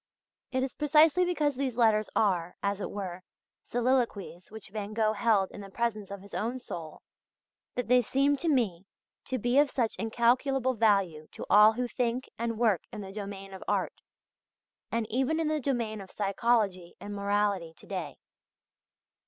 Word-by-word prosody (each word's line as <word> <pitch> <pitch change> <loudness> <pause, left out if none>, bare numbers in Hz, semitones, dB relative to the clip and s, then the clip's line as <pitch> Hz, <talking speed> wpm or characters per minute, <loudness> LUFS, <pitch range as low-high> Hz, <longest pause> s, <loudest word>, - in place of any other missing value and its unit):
It 260 0 0
is 265 - -3
precisely 310 +4 +4
because 300 -5 0
these 260 -2 -2
letters 215 -3 +3
are, 180 -5 +1
as 200 0 -1
it - - -3
were, 185 -3 -5 0.4
soliloquies 235 -8 -1
which 220 -2 -10
Van 210 0 -5
Gogh 215 -1 +2
held 210 -3 +2
in - - -9
the 195 - -9
presence 215 -1 -2
of 200 -1 -7
his 200 - -15
own 235 +4 -2
soul, 165 -10 -8 0.7
that 250 - -2
they 250 +1 +5
seem 275 +4 +2
to 330 +4 -1
me 200 - 0 0.4
to 260 - -2
be 245 +4 +2
of 290 -1 +4
such 240 -4 0
incalculable 250 +3 +2
value 195 -9 +2
to - - -7
all 210 +2 +8
who 245 +2 -2
think 245 +1 -2
and 230 -1 -2
work 215 -7 +2
in - - -6
the 195 -1 -8
domain 195 -1 -7
of 190 - -8
art, - - 0 1.0
and 230 -1 0
even 265 +7 +1
in 320 -2 0
the 310 0 0
domain 235 -6 -2
of 190 - -11
psychology 200 -3 0
and 205 - -7
morality 200 -4 0
to - - -15
day. 180 -7 -5
220 Hz, 170 wpm, -29 LUFS, 200-250 Hz, 1.0 s, all